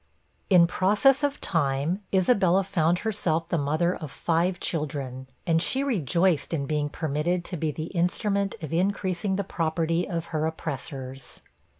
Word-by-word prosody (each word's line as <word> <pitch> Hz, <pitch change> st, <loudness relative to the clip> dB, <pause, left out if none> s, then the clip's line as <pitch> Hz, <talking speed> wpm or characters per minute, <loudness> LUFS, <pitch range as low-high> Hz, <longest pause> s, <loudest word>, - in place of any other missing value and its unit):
In 180 Hz, -3 st, +7 dB
process 210 Hz, +11 st, +3 dB
of 285 Hz, -1 st, 0 dB
time, 150 Hz, +3 st, 0 dB
Isabella 190 Hz, -1 st, +3 dB
found 175 Hz, -3 st, +1 dB
herself 170 Hz, -7 st, 0 dB
the 170 Hz, -, +1 dB
mother 155 Hz, +5 st, +1 dB
of 155 Hz, -, -7 dB
five 175 Hz, +5 st, 0 dB
children, 135 Hz, -5 st, -3 dB, 0.2 s
and 165 Hz, -1 st, +2 dB
she 265 Hz, +9 st, 0 dB
rejoiced 175 Hz, -, +1 dB
in 140 Hz, -3 st, -2 dB
being 150 Hz, 0 st, -1 dB
permitted 160 Hz, +4 st, -1 dB
to 180 Hz, -, -5 dB
be 160 Hz, 0 st, -1 dB
the 155 Hz, +1 st, -4 dB
instrument 195 Hz, +3 st, 0 dB
of 155 Hz, -, -5 dB
increasing 190 Hz, +1 st, 0 dB
the 200 Hz, -, -1 dB
property 165 Hz, -1 st, -1 dB
of 170 Hz, -2 st, -2 dB
her 155 Hz, 0 st, +1 dB
oppressors! 135 Hz, -4 st, -6 dB
170 Hz, 150 wpm, -26 LUFS, 155-190 Hz, 0.2 s, In